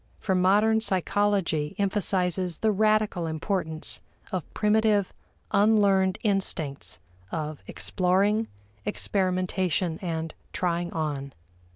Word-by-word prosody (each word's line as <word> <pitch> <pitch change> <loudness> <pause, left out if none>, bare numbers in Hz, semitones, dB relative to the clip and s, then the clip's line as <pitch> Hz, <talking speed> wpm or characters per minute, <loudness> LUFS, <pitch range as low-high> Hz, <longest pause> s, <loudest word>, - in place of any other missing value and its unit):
For 190 - -1
modern 205 +5 +4
psychology 190 -6 +1
emphasizes 185 -3 0
the 220 - +2
radical 215 -4 +2
importance 160 0 -2 0.3
of 185 -3 -4
primitive 210 -2 +2 0.4
unlearned 200 -3 +4
instincts 190 -9 -1 0.3
of 155 -2 -4
exploring, 200 +4 +1 0.4
experimentation, 185 - 0
and 165 -3 -3 0.2
"trying 175 -1 -1
on." 145 -4 -3
185 Hz, 85 wpm, -27 LUFS, 165-205 Hz, 0.4 s, modern